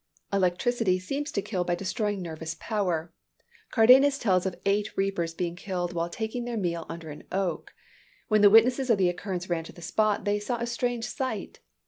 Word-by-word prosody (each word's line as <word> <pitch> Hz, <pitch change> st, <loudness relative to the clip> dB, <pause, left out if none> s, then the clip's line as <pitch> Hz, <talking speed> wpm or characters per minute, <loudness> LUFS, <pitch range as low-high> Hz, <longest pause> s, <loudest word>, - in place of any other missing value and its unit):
Electricity 190 Hz, +2 st, +2 dB
seems 275 Hz, +11 st, -4 dB
to 200 Hz, -, -2 dB
kill 195 Hz, -4 st, -1 dB
by 175 Hz, 0 st, 0 dB
destroying 200 Hz, +1 st, -2 dB
nervous 160 Hz, -1 st, -5 dB
power. 180 Hz, -7 st, -2 dB, 0.6 s
Cardanus 260 Hz, +5 st, +6 dB
tells 190 Hz, -7 st, +2 dB
of 185 Hz, -, -5 dB
eight 205 Hz, +2 st, 0 dB
reapers 185 Hz, -4 st, -1 dB
being 175 Hz, -1 st, -2 dB
killed 175 Hz, -2 st, -3 dB
while 170 Hz, 0 st, -1 dB
taking 220 Hz, +6 st, -4 dB
their 240 Hz, -1 st, -3 dB
meal 170 Hz, -4 st, -2 dB
under 165 Hz, -2 st, -7 dB
an 150 Hz, -, -10 dB
oak. 185 Hz, -4 st, -2 dB, 0.5 s
When 215 Hz, -1 st, +3 dB
the 205 Hz, -, +8 dB
witnesses 245 Hz, +5 st, +5 dB
of 230 Hz, -, +5 dB
the 185 Hz, -2 st, +3 dB
occurrence 180 Hz, 0 st, -4 dB
ran 170 Hz, -2 st, -1 dB
to -, -, -10 dB
the -, -, -14 dB
spot, 210 Hz, +2 st, +1 dB
they 205 Hz, 0 st, +1 dB
saw 235 Hz, +4 st, -2 dB
a 235 Hz, -, -2 dB
strange 240 Hz, 0 st, -2 dB
sight. 260 Hz, +3 st, -4 dB
195 Hz, 185 wpm, -27 LUFS, 175-225 Hz, 0.6 s, the